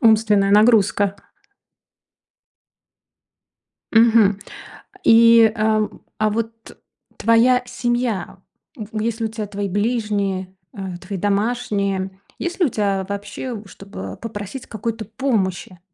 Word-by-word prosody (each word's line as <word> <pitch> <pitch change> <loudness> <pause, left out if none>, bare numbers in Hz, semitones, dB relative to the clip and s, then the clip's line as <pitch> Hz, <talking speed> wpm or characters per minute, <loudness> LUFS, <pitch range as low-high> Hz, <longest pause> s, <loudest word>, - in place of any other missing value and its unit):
Умственная 215 -3 +4
нагрузка. 205 -2 +4 2.8
Мгм. 225 -3 +5 0.7
И, 230 -3 +7
э, 215 -1 +1 0.3
а 215 0 +2
вот 225 +1 -5 0.4
твоя 245 +2 +4
семья 240 -3 -2 0.4
в 215 -1 -6
есть 225 +1 -2
ли 225 - 0
у - - -2
тебя 215 -1 -5
твои 200 0 -4
ближние, 205 -3 -1 0.2
э, 190 -3 -5
твои 190 +1 -6
домашние, 200 -2 -1 0.3
есть 345 +2 -4
ли 350 - +5
у - - +1
тебя 200 -3 -1
вообще 205 +3 -5
чтобы 195 +1 -9
попросить 225 +2 -7
какой-то 220 0 -4
помощи. 205 -6 -2
215 Hz, 105 wpm, -20 LUFS, 200-230 Hz, 2.8 s, И